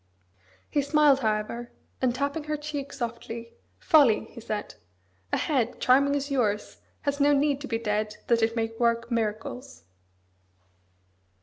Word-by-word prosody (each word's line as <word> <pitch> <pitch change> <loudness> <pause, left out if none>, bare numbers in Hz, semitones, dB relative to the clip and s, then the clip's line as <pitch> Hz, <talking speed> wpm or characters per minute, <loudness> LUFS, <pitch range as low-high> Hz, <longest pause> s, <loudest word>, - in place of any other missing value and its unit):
He 290 - +1
smiled, 285 -1 +4
however, 220 +1 -2 0.3
and 250 -2 +2
tapping 280 +3 -2
her 305 0 -2
cheek 295 -2 -5
softly, 235 -1 -6 0.2
"Folly!" 285 -10 +4
he 235 - -10
said. 215 -1 -4 0.6
"A - - +2
head, 255 -6 0
charming 280 +3 +4
as 285 0 -2
yours, 210 -6 0 0.2
has 285 0 -1
no 290 +1 +5
need 285 0 +2
to 285 - -5
be 225 - -1
dead 215 -1 -1
that 235 -1 +2
it 225 +1 +1
may 225 -1 -1
work 235 0 +1
miracles!" 230 - -3
245 Hz, 140 wpm, -27 LUFS, 225-285 Hz, 0.6 s, no